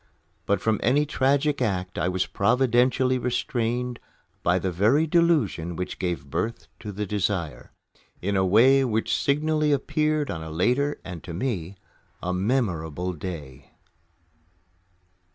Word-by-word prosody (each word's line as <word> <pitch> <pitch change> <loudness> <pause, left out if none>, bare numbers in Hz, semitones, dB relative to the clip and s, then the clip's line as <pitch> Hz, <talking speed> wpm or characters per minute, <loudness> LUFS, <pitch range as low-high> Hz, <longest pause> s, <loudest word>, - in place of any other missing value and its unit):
But 100 - +2
from 110 -2 +1
any 140 +6 +3
tragic 140 0 +1
act 95 -5 -1
I 90 - +1
was 95 0 0
providentially 125 +3 +2
restrained 120 0 -1 0.4
by 90 +1 +2
the 95 0 -1
very 110 - +3
delusion 150 - +1
which 90 +2 -5
gave 90 -5 -2
birth 110 +8 -2
to 105 - -6
the 105 +1 -3
desire 95 -5 -2 0.5
in 100 +2 -1
a 95 - +3
way 125 +9 +5
which 110 -3 0
signally 150 +1 +1
appeared 150 +1 0
on 80 - -5
a 80 - -7
later 125 - +1
and, 90 -4 -7
to 85 - -7
me, 95 -4 -3 0.4
a 90 - -2
memorable 90 - -1
day. 75 -6 -8
110 Hz, 135 wpm, -25 LUFS, 90-135 Hz, 0.5 s, way